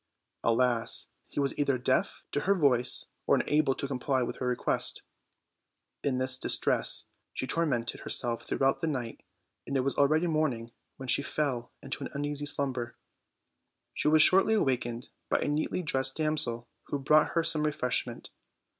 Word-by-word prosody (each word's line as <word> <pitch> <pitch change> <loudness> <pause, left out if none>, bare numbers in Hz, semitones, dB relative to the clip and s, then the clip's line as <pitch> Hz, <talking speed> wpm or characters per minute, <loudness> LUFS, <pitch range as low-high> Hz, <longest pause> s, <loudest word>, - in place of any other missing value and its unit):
Alas! 115 0 +1 0.2
he - - -5
was 140 -1 0
either 140 -2 +1
deaf 130 +1 -1
to - - 0
her 200 +6 +2
voice 135 -8 +2 0.2
or - - +5
unable 150 -3 +1
to 140 - -4
comply 130 -1 -1
with - - -5
her 125 - -3
request. 125 -1 0 1.0
In 135 -3 0
this 130 0 +2
distress - - +2 0.3
she - - -3
tormented 130 -7 -1
herself 120 -1 +2
throughout 135 0 0
the 165 - -1
night, 125 -6 -4 0.5
and 140 - -1
it - - +2
was 135 +1 -1
already 155 +4 +3
morn 155 -4 +1
ing 115 0 -9 0.3
when 135 - -8
she 135 - +4
fell 135 -4 -2
into 135 - -5
an - - -5
uneasy 145 0 -2
slumber. 130 -5 -2 1.0
She - - -1
was 155 0 +6
shortly 195 +4 +5
awakened 125 - -1 0.2
by - - +2
a - - -2
neatly 155 +4 -1
dressed 135 -3 +1
damsel, 150 -7 -1 0.2
who 145 - -3
brought 150 +2 +3
her 165 - +1
some 160 -2 +1
refreshment. 125 -5 -2
135 Hz, 165 wpm, -29 LUFS, 125-150 Hz, 1.0 s, was